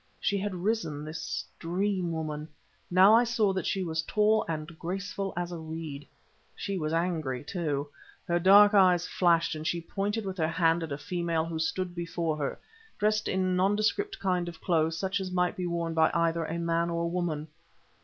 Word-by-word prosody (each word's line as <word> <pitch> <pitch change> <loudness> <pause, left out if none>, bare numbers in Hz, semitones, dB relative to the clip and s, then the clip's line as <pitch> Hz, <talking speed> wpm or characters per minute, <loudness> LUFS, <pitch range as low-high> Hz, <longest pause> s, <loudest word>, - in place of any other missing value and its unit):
She 200 0 0
had 200 -1 -3
risen, 180 -6 -2
this 155 +1 -4
dream 185 +1 -1
woman. 155 -2 -4 0.4
Now 185 +4 +7
I 230 +2 +6
saw 225 -4 +1
that 190 - -2
she 195 - 0
was 160 -2 -1
tall 215 +5 +2
and 155 -2 -2
graceful 195 +2 -3
as 175 0 -2
a 170 - -5
reed. 160 -3 -7 0.5
She 200 - -3
was 155 -1 -2
angry, 160 -6 -1
too; 150 -4 -2 0.4
her 175 0 +2
dark 205 +3 +7
eyes 180 -3 +5
flashed, 170 -2 +2
and 155 0 -4
she 175 - 0
pointed 205 +5 -3
with 190 -1 -5
her 160 - +2
hand 165 0 +2
at 165 -2 -5
a 140 - -2
female 170 -2 -1
who 165 -1 -4
stood 175 +3 -1
before 170 -2 -2
her, 145 -2 -2 0.4
dressed 215 +1 +1
in 185 -1 +1
nondescript 215 - +1
kind 180 -2 0
of 170 - -11
clothes 165 -2 +1
such 190 +3 -1
as 190 -1 -4
might 180 +2 +1
be 180 -3 -3
worn 170 -1 -2
by 160 -1 +4
either 165 -1 +1
a 165 +2 -3
man 170 0 0
or 170 0 -1
a - - 0
woman. 170 -3 -2
175 Hz, 190 wpm, -29 LUFS, 160-190 Hz, 0.5 s, Now